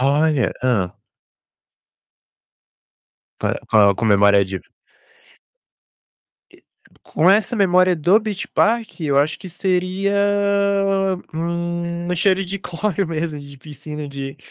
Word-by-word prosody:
Olha. 145 0 +2
Hã. 105 -8 0 2.5
Pa - - -1
Qual 100 -2 +5
com - - -5
a - - +2
memória 100 0 +5
de 95 0 -5 1.9
E - - -22 0.4
com 170 +4 +2
essa 215 +4 +2
memória 185 -2 +3
do 175 +7 +4
Beach 210 -3 -4
Park 230 -3 0
eu 145 -3 +1
acho 150 +3 +1
que 190 - -10
seria, 185 +2 -1 1.2
hum, 170 +1 -3
cheiro 190 +2 +2
de 195 +2 -5
cloro 195 +1 -2
mesmo 160 -1 -3
de 140 0 -12
piscina, 150 +2 -8
de 135 0 -7
165 Hz, 110 wpm, -20 LUFS, 140-185 Hz, 2.5 s, Qual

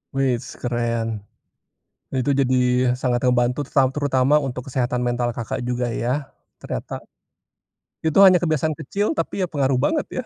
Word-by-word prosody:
Weis 130 -2 -1
keren, 120 -2 -1 1.1
itu 130 +2 0
jadi 130 -1 +2 0.5
sangat 125 -2 +1
ngebantu 125 +1 +2
teru 135 -2 +2
terutama 145 -1 +2
untuk 125 -1 -4
kesehatan 125 -1 -1
mental 120 -1 -1
Kakak 115 +2 -4
juga 125 -1 -1
ya 120 +1 -2 0.5
ternyata. - - -5 1.1
Itu 160 +4 +2
hanya 185 -1 +6
kebiasaan 155 -1 0
kecil 200 +8 -1
tapi - - -2
ya 180 - +1
pengaruh 135 -4 0
banget 300 - +1
ya. - - 0
130 Hz, 140 wpm, -22 LUFS, 120-145 Hz, 1.1 s, hanya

